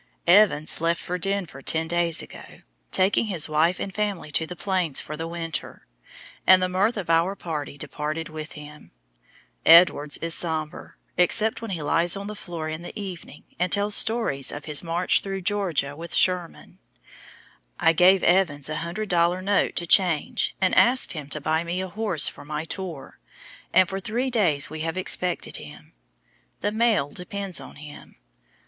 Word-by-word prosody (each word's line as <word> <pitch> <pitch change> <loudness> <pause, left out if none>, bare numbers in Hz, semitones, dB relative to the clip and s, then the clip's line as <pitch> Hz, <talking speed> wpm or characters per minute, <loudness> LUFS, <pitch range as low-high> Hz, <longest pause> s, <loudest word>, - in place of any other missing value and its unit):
Evans 175 -5 +4
left 165 0 +1
for 180 0 -4
Denver 185 -7 -2
ten 160 +4 0
days 170 -1 +1
ago, - - -13 0.3
taking 190 +4 +2
his 180 -8 +1
wife 160 +3 +1
and 195 - -5
family 200 -6 -3
to 160 +2 0
the 180 - -7
Plains 180 -5 -1
for 155 - -7
the 165 +1 -5
winter, 165 -2 -6 0.6
and 185 0 +8
the 185 - +1
mirth 195 +5 0
of 195 - -4
our 165 +4 +2
party 150 -6 -5
departed 155 +3 -4
with 155 0 -8
him. 150 0 -12 0.7
Edwards 160 -3 +6
is 165 0 -3
somber, 160 -3 -4 0.2
except 215 +6 +2
when 230 - -6
he 170 -5 -4
lies 170 +5 +1
on 200 - -6
the 210 +1 -6
floor 170 -5 -6
in 155 +1 -5
the 175 - -8
evening, 180 -7 -8 0.2
and 180 -1 0
tells 205 +1 +1
stories 220 - +1
of 145 0 -8
his 150 -2 +1
march 170 +1 +1
through 195 -1 -5
Georgia 175 -8 0
with 170 +2 -6
Sherman. 180 -2 0 1.0
I 165 - +4
gave 185 +3 +5
Evans 160 -6 +2
a 155 0 -2
100 175 +6 -4
dollar 175 0 +2
note 200 +2 +1
to 170 - 0
change, 170 -4 +2
and 190 -1 +2
asked 255 +2 +4
him 150 -4 -7
to 150 - -2
buy 160 +2 0
me 170 +2 -3
a 190 - -3
horse 200 -5 +1
for - - -7
my 150 +1 -4
tour, 170 -4 -7 0.5
and 185 - +5
for 190 +2 -4
three 240 +7 -2
days 170 - +2
we 155 +1 -8
have 165 +3 -3
expected 180 -1 -1
him. - - -12 0.7
The 205 - 0
mail 220 -10 +1
depends 190 +1 -4
on - - -12
him. 150 0 -12
175 Hz, 175 wpm, -24 LUFS, 155-195 Hz, 1.0 s, and